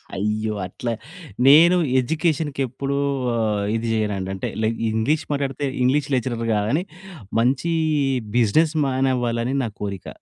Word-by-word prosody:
అయ్యో! 105 +2 -1
అట్లా, 120 +6 -4 0.6
నేను 165 +6 +7 0.2
ఎడ్యుకేషన్‌కి 155 0 -1
ఎప్పుడు 135 +3 -3 0.4
ఆహ్, 105 -3 0
ఇది 115 +1 -2
చేయనండి. 105 -4 -1
అంటే 95 - -4 0.2
లైక్ 115 +1 0
ఇంగ్లీష్ 120 +8 0
మాట్లాడితే 140 0 -2 0.2
ఇంగ్లీష్ 140 +3 +2
లెక్చరర్ 120 -2 -2
కాదని, 110 +11 0 0.6
మంచి 130 +8 +1 0.7
బిజినెస్ 155 +8 +3
మ్యాన్ 130 0 +1
అవ్వాలని 120 +1 -1
నా 115 - -2
కోరిక. 100 -3 -5
125 Hz, 125 wpm, -22 LUFS, 110-140 Hz, 0.7 s, నేను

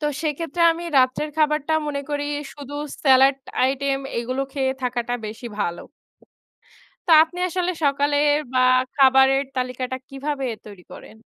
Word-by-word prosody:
তো 300 - -4 0.2
সেক্ষেত্রে 325 +2 -2
আমি 340 +1 -7
রাত্রের 260 +4 +1
খাবারটা 305 0 +1
মনে 285 -1 -3
করি 290 0 -2 0.3
শুধু 285 -1 -9 0.3
স্যালাদ 270 -1 +5 0.3
আইটেম, 270 +1 0 0.2
এইগুলো 255 +3 -2
খেয়ে 265 -2 0
থাকাটা 245 -1 -2
বেশি 220 +3 -8
ভালো। 170 -2 -2 1.3
তা 335 - +3
আপনি 350 +2 -12
আসলে 360 +1 -1
সকালের 290 +1 +2 0.2
বা - - +2 0.4
খাবারের 270 0 +5
তালিকাটা 255 0 -3
কিভাবে 275 0 -4 0.2
তৈরি 200 -4 -12
করেন? - - -12
275 Hz, 135 wpm, -22 LUFS, 255-295 Hz, 1.3 s, স্যালাদ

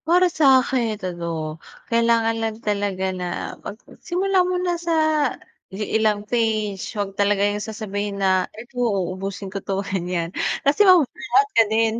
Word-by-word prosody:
Para 355 +1 +4
sa'kin 260 -6 +3
ano, 165 -3 -4 0.3
kailangan 230 -1 +3
lang 220 -1 -2
talaga 200 -3 -2
na 180 -1 -4
magsimula 365 - -2
muna 360 -1 0
sa 340 -1 -1 0.8
li 205 +2 -4
ilang 215 -2 +1
page 215 -4 0 0.2
'wag 200 -1 -2
talaga 200 0 +2
yung 205 0 -2
sasabihin 205 -2 -4
na 190 -1 +3 0.2
eto 240 +3 -13
uubusin 195 -2 -2
ko 195 - -4
'to, 195 0 -2
ganiyan. 180 -2 -3 0.3
Kasi 295 +9 +5
mababagot 370 +5 +3
ka 230 - +7
din. 225 0 +2
210 Hz, 135 wpm, -22 LUFS, 195-240 Hz, 0.8 s, ka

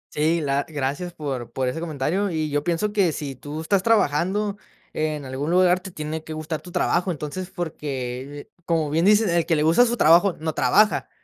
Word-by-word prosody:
Sí, 160 +3 +2
la 140 -1 0
gracias 145 +4 -3
por 135 -7 -5
por 130 -1 -2
ese 145 +6 -2
comentario, 170 +5 -1
y 155 -2 -2
yo 145 0 0
pienso 175 +6 -1
que 190 -6 +3
si 145 -2 -5
tú 145 +4 -7
estás 185 +3 +1
trabajando 200 0 +1 0.4
en 155 -2 -2
algún 135 +4 -4
lugar, 180 0 +4
te 190 - -9
tiene 155 -2 -5
que 160 - -7
gustar 155 0 -4
tu 180 - -12
trabajo, 175 +2 +1
entonces, 165 +4 -5
porque, 140 -5 -5 0.2
como 160 -4 0
bien 165 +4 +2
dices, 210 +1 +5
el 170 -1 +1
que 165 - +3
le 150 - +1
gusta 170 +10 +5
su 240 - -1
trabajo 175 +3 +5
no 160 0 -2
trabaja, 210 +7 +3
160 Hz, 200 wpm, -23 LUFS, 145-180 Hz, 0.4 s, dices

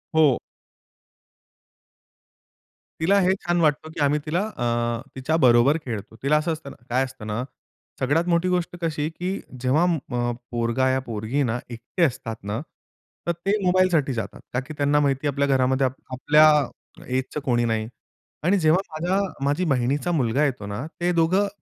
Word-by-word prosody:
हो. 150 -5 +5 2.6
तिला 195 +5 +4
हे 185 - +4
छान 175 -2 -1
वाटतं, 155 0 +1
की - - -9
आम्ही 145 +2 +2
तिला 165 +4 0 0.2
अ, 120 -1 0
तिच्याबरोबर 130 -1 +4
खेळतो. 110 -3 -5
तिला 150 +2 +4
असं 160 +2 0
असतं 155 -3 -8
ना, - - -12
काय 130 +2 +2
असतं 130 -4 -10
ना 110 +3 -2 0.6
सगळ्यात 145 +6 +2
मोठी 175 +1 +2
गोष्ट 180 -1 -1
कशी 155 -2 -1
की 180 +4 -4 0.2
जेव्हा 130 +6 +3 0.3
अ, 120 0 0 0.2
पोरगा 120 +2 +1
या 130 0 +2
पोरगी 115 +5 -1
ना 120 +2 -1
एकटे 120 +9 -3
असतात 120 -6 -1
ना, 105 +3 -3 0.7
तर - - +3
ते 185 +5 -1
मोबाईलसाठी 180 -6 +3
जातात. 110 -5 -5
का 125 - +1
की 135 +4 -7
त्यांना 145 +1 +3
माहिती 140 0 +1
आपल्या 140 0 +1
घरामध्ये 130 0 +2
आपल्या 135 +4 +3 0.6
एजचं 130 +3 -2
कोणी 120 -3 +1
नाही. 110 -1 -1 0.6
आणि 185 +5 +3
जेव्हा 160 +2 +4
माझ्या 175 +5 0 0.3
माझी 145 +6 +1
बहिणीचा 140 +3 +1
मुलगा 135 -3 +1
येतो 125 -7 -2
ना, 105 +6 -4 0.2
ते 175 +1 +2
दोघं 185 +5 +3
140 Hz, 155 wpm, -24 LUFS, 120-165 Hz, 2.6 s, हो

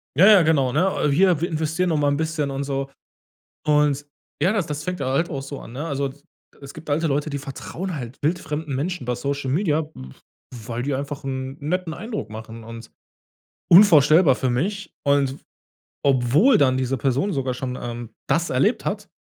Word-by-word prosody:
Ja, 170 +7 +6
ja, 210 -3 +8
genau, 150 -6 +2
ne? 155 +1 +1
Hier, 180 +2 +4
wir 170 - 0
investieren 160 +2 -1
noch 160 - +1
mal 145 -1 +2
'n 140 - 0
bisschen 155 -2 -1
und 135 +1 -3
so. 135 -1 -3 0.8
Und, 150 -1 +2 0.4
ja, 180 +5 +3
das 210 -6 -1
das 150 0 -4
fängt 180 +2 -4
halt 135 +6 0
auch 140 -4 -4
so 140 0 -7
an, - - -11
ne? 145 +5 -4
Also, 140 -3 -2 0.5
es 140 0 -10
gibt 155 0 -11
alte 160 +3 +1
Leute, 145 +1 -1
die 140 -1 -3
vertrauen 160 +6 -6
halt 125 -2 -7
wildfremden 150 -2 -2
Menschen 170 +3 -3
über 125 0 -2
Social 140 +2 -3
Media, 160 -1 +1
w 65 0 -10 0.5
weil 120 +1 -3
die 140 +1 -1
einfach 140 +1 -4
'n 130 0 -4
netten 165 +3 -2
Eindruck 220 0 -5
machen 110 +1 -9
und 115 0 -10 0.8
unvorstellbar 160 -5 +7
für 130 - -1
mich. 190 +12 -2
Und 140 -1 +2 0.7
obwohl 140 - +4
dann 130 -2 +3
diese 130 0 -1
Person 140 - 0
sogar 130 -3 -1
schon, 125 0 -4
ähm, 120 -1 -6 0.2
das 170 +1 +1
erlebt 195 - +1
hat 205 0 -3
145 Hz, 185 wpm, -23 LUFS, 130-165 Hz, 0.8 s, ja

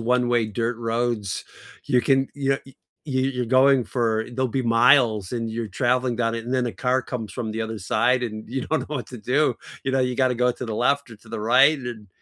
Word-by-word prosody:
one-way 120 -1 +2
dirt 115 +2 -2
roads, 115 -3 -2 0.4
you 125 -3 +2
can, 135 0 +2
you 140 -1 -1
know 135 - +2
y 135 - -16 0.6
you're 125 0 -1
going 130 +2 +4
for 110 -1 -1
there'll 130 +1 0
be 130 +2 -1
miles, 115 -4 +4
and 115 -2 -2
you're 115 0 -3
traveling 125 +4 0
down 115 -1 0
it, 115 - -5
and 125 +2 -2
then 125 -1 +1
a 120 - -3
car 130 +1 0
comes 115 -4 -6
from 120 -3 -4
the 110 +1 -4
other 110 0 -3
side, 120 +6 +1
and 110 -2 -5
you 130 +2 -3
don't 160 - -1
know 150 - -5
what 125 - -6
to 125 - -9
do. 130 +4 +1 0.3
You 135 - 0
know, 135 - +1
you've 125 -1 0
got 130 -1 +3
to 125 - -1
go 125 +1 +2
to 125 - -7
the 115 -2 -4
left 140 +2 +1
or 115 - -11
to 110 +2 -20
the 115 -1 -5
right 135 +7 +5
and 135 - -9
then 110 -4 -7
120 Hz, 245 wpm, -23 LUFS, 115-130 Hz, 0.6 s, right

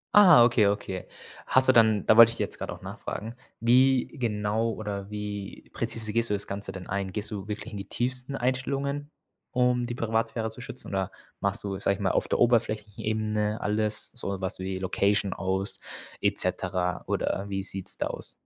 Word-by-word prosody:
Ah, 180 -12 +9
okay, 115 -4 +4
okay. 100 -2 -3 0.4
Hast 130 0 +5
du - - +8
dann 110 -3 +4
da 110 - +5
wollte 115 0 +9
ich - - -3
jetzt - - -2
grad - - -5
auch - - -7
nachfragen, 115 +2 -6 0.3
wie 130 +2 +4
genau 110 -3 -1
oder 100 -2 -5
wie 105 -1 -6
präzise 110 -2 0
gehst 115 +1 +3
du 105 - +1
das 100 - 0
Ganze 100 0 -4
denn 95 -1 -8
ein? 100 -1 -3
Gehst 105 +2 -2
du 100 -1 -5
wirklich 110 +2 -5
in - - -5
die 100 0 -7
tiefsten 125 +2 -1
Einstellungen, 140 +3 -2 0.4
um 125 -1 +1
die 120 - -4
Privatsphäre 115 0 -1
zu 125 - -7
schützen? 125 - -6
Oder 95 -1 -1 0.3
machst 100 0 -1
du, 100 -1 -4
sage 100 0 +1
ich - - -12
mal, - - +1
auf - - 0
der - - 0
oberflächlichen 110 -3 +1
Ebene 110 0 -1
alles, 105 +1 -1
so 100 -6 -4
was 95 0 -3
wie 95 0 -3
Location 100 +1 +1
aus 95 +1 -1 0.4
et - - +1
cetera, 90 -1 0
oder 100 - -1
wie 95 -1 -2
sieht's 95 -1 -1
da - - -1
aus? - - -3
105 Hz, 190 wpm, -27 LUFS, 100-120 Hz, 0.4 s, Ah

